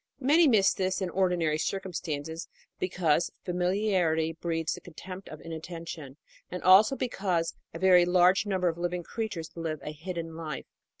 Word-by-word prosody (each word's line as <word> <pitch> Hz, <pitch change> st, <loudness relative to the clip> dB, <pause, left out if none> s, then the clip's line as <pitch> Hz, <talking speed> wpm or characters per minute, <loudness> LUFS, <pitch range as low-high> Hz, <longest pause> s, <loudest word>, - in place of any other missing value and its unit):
Many 300 Hz, +5 st, +5 dB
miss 210 Hz, -7 st, +5 dB
this 185 Hz, 0 st, -1 dB
in 185 Hz, -3 st, -2 dB
ordinary 175 Hz, -5 st, +1 dB
circumstances 165 Hz, -4 st, -3 dB, 0.3 s
because 175 Hz, -3 st, +1 dB, 0.2 s
familiarity 180 Hz, -3 st, +1 dB
breeds 165 Hz, -1 st, -2 dB
the -, -, -8 dB
contempt 185 Hz, +3 st, -9 dB
of 155 Hz, -, -9 dB
inatten 165 Hz, +1 st, -7 dB
tion, 145 Hz, -5 st, -8 dB, 0.3 s
and 180 Hz, -, -6 dB
also 200 Hz, +7 st, +7 dB
because 190 Hz, -10 st, -1 dB, 0.2 s
a -, -, -7 dB
very 180 Hz, 0 st, +6 dB
large 180 Hz, +3 st, +4 dB
number 185 Hz, -2 st, +1 dB
of 170 Hz, 0 st, -1 dB
living 175 Hz, 0 st, -2 dB
creatures 180 Hz, -7 st, -4 dB
live 160 Hz, -2 st, -3 dB
a 150 Hz, -, -4 dB
hidden 165 Hz, +1 st, -6 dB
life. 155 Hz, -5 st, -5 dB
175 Hz, 155 wpm, -29 LUFS, 165-190 Hz, 0.3 s, also